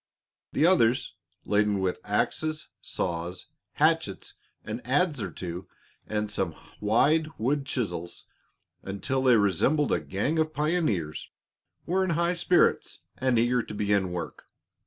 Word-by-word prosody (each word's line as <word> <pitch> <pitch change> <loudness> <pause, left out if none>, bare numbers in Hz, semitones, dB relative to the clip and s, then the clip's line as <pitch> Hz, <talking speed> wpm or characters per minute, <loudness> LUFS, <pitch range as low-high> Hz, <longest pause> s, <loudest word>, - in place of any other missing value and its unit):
The 155 - +3
others, 130 - +3 0.3
laden 105 -1 +2
with 95 -1 -1
axes, 155 -1 -1
saws, 85 +1 -3 0.2
hatchets, - - +1 0.3
an - - -5
adz 145 +3 +1
or - - -3
two 90 0 -6 0.4
and 105 -1 -2
some 95 -6 -2 0.2
wide 145 +10 +3
wood 135 +4 0
chisels 90 -10 -3 0.6
until 100 +8 -2
they 130 -2 +5
resembled 110 - +2
a - - +2
gang 100 - -1
of 155 0 0
pioneers, 150 - 0 0.6
were 190 +2 +1
in 190 - -1
high 170 +1 +2
spirits 175 0 +2 0.2
and 130 -2 +2
eager 120 +2 +3
to 105 - -8
begin 100 -3 +1
work. 90 -1 -6
115 Hz, 130 wpm, -27 LUFS, 95-155 Hz, 0.6 s, they